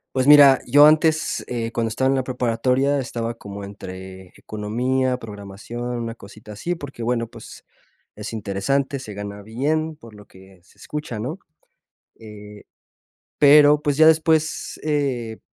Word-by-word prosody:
Pues 130 0 +1
mira, 145 -2 +8
yo 145 +4 +7
antes, 155 +1 +2
eh, 115 -2 -3
cuando 115 -1 -2
estaba 130 +4 0
en 135 - +2
la 130 - 0
preparatoria, 125 +3 0
estaba 120 -3 -4
como 100 -3 -9
entre 95 -2 -10
economía, 125 +5 -2
programación, 105 +1 -9 0.2
una 115 -1 -5
cosita 105 -1 -13
así. 170 +13 -3
Porque, 140 -7 -9
bueno, 115 0 -1
pues, 115 -1 -13 0.5
es - - -7
interesante, 110 +7 -2
se 110 -5 -9
gana 100 0 -7
bien 150 +9 -2
por 115 -6 -15
lo 105 -1 -15
que 95 -1 -18
se 90 - -26
escucha, 150 -7 -6
¿no? 130 - -5 0.8
Eh, 105 -1 -12 0.8
pero, 145 0 +6
pues, 145 -2 -1
ya 155 - +6
después, 160 -1 +2
eh, 135 -7 -2
120 Hz, 145 wpm, -22 LUFS, 105-140 Hz, 0.8 s, mira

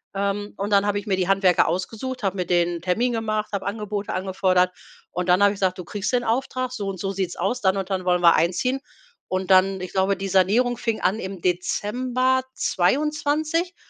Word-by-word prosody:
Ähm, 200 +1 -2
und 200 +2 -3
dann 200 0 +4
habe 205 0 +1
ich 205 - -5
mir 195 -2 0
die 185 -1 0
Handwerker 195 -2 +3
ausgesucht, 225 +7 -3
habe 195 0 -1
mit 180 -2 -3
denen 175 -1 +2
n' - - -11
Termin 205 +8 +1
gemacht, 215 -2 -2
habe 200 -1 -2
Angebote 210 0 -3
angefordert 185 -1 +1 0.4
und 180 +1 -3
dann 180 +3 +5
habe 200 - +6
ich - - -10
gesagt: 185 -1 +1
„Du 180 - -6
kriegst 205 +5 -3
den 245 -1 +2
Auftrag, 255 +2 -1
so 210 -6 -4
und 195 -2 -4
so 195 +2 -2
sieht's 190 -2 -3
aus, 200 +8 -1
dann 190 0 +2
und 195 -1 -3
dann 185 -1 -2
wollen 180 -1 +2
wir 170 -1 +7
einziehen.“ 185 +11 +1 0.5
Und 185 0 -2
dann 190 0 +4
ich 185 - -6
glaube, 195 +1 +1
die 195 +1 -4
Sanierung 210 +7 +3
fing 225 -1 -2
an 205 +4 +1
im 190 -3 -6
Dezember 245 +8 0
2022 300 - 0
195 Hz, 210 wpm, -23 LUFS, 185-230 Hz, 0.5 s, wir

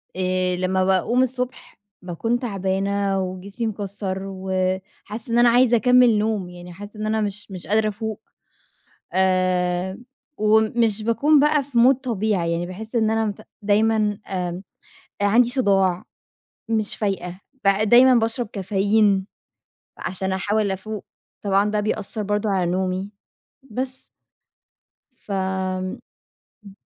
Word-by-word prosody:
آآ، 185 0 0
لمّا 185 +1 0
باقوم 190 +7 +2
الصبح، 250 0 -4 0.2
باكون 225 +7 -2
تعبانة 195 -2 -1
وجسمي 195 +5 -4
مكسر 200 -2 -4
وحاسة 190 +4 -3
إن 235 - +3
أنا 240 0 +6
عايزة 240 0 +5
أكمل 250 -1 +5
نوم، 210 -4 -1
يعني 175 0 -11
حاسة 205 +3 -10
إن 215 - -2
أنا 220 0 0
مش 205 0 -4
مش 180 -2 -8
قادرة 215 +1 +2
أفوق، 220 +1 -5 0.9
آآ 185 0 +1 0.4
ومش 220 0 +2
باكون 285 +7 +3
بقى 295 0 +3
في 265 -2 -5
مود 250 +3 +6
طبيعي، 215 -9 -1
يعني 170 +1 -1
باحس 215 +6 -8
إن 220 -2 +3
أنا 225 0 +1
مت 205 -2 -4 0.2
دايمًا 215 +2 +3 0.3
آمم، 180 -1 -3 0.6
آآ، - - +3
عندي 235 +4 +4
صُداع، 195 -8 +2 0.7
مش 220 -2 0
فايقة، 190 -3 -3 0.3
ب - - +4 0.2
دايمًا 255 +2 +7
باشرب 230 +1 +1
كافيين، 200 0 +1 0.7
عشان 190 +2 -3
أحاول 205 +1 0
أفوق. 205 +2 -6 0.4
طبعًا 200 +1 +2
ده 210 - 0
بيأثر 215 0 -2
برضه 205 +1 -1
على 180 -3 +1
نومي، 185 +2 -2 0.6
بس. 255 +3 -4 1.1
فآمم، 190 -1 -3 0.7
امم. 195 -1 -13
205 Hz, 125 wpm, -22 LUFS, 190-225 Hz, 1.1 s, دايمًا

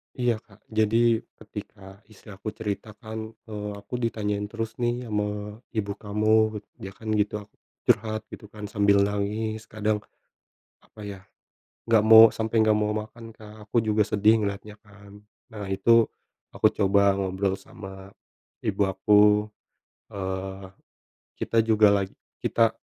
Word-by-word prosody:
Iya, 120 -3 0
Kak, 105 -1 -23
jadi 110 +1 +3 0.2
ketika 100 -2 -11
istri 110 0 -15
aku 100 +3 -10
cerita 105 -1 -5
kan, 110 0 -7 0.2
eee, 105 -1 -4
"Aku 125 - -5
ditanyain 105 -3 -2
terus 115 +1 -4
nih 120 +1 0
ama 105 0 -3 0.2
ibu 100 -2 -1
kamu," 110 +1 +1 0.2
dia 95 0 -8
kan 110 -1 -5
gitu. 105 0 -1
Aku 100 - -25 0.3
curhat 110 0 +1
gitu 105 - -10
kan 105 0 -11
sambil 100 -1 +4
nangis, 105 +2 -2
kadang 110 0 -1 0.8
apa - - -21
ya, 100 -2 -7 0.7
nggak 115 -2 +4
mau 110 +1 +9
sampai 110 0 +1
nggak 110 - +4
mau 105 0 0
makan, 115 +2 -8
Kak, 110 -1 -14
aku - - 0
juga 105 0 +2
sedih 105 +1 +3
ngeliatnya 100 +1 -4
kan. 100 0 -16 0.3
Nah 105 -3 -6
itu 115 +4 +4 0.4
aku - - +3
coba 100 0 +3
ngobrol 95 0 -1
sama 95 0 -10 0.6
ibu 105 -1 -1
aku, 105 +2 +4 0.9
eee, 95 0 -5 0.7
kita 115 - +1
juga 110 -2 +5
lag 100 -1 +1 0.3
kita 115 -1 +2
105 Hz, 140 wpm, -26 LUFS, 100-110 Hz, 0.9 s, mau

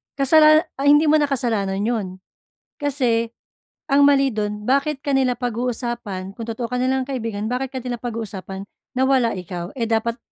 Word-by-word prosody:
Kasalana 310 +3 +6 0.2
ah, 280 - +1
hindi 295 +2 +6
mo 310 - +5
na 290 - +2
kasalanan 215 -7 -1
'yon. 220 -3 -1 0.8
Kasi 245 -5 +1 0.6
ang 285 -1 +4
mali 275 -1 +4
dun 210 0 -3
bakit 280 +2 +1
ka 280 - 0
nila 255 -2 +2
pag-uusapan 235 -5 -3
kung 230 - -7
totoo 230 +1 -3
ka 250 - -1
nilang 260 0 0
kaibigan, 225 -6 -3
bakit 255 +1 -2
ka 260 - -3
nila 245 -1 -4
pag-uusapan 205 -5 -5 0.3
na - - +3
wala 260 -4 +3
ikaw, 175 0 -6
eh, 230 - 0
dapat 225 +1 0
245 Hz, 170 wpm, -21 LUFS, 220-270 Hz, 0.8 s, Kasalana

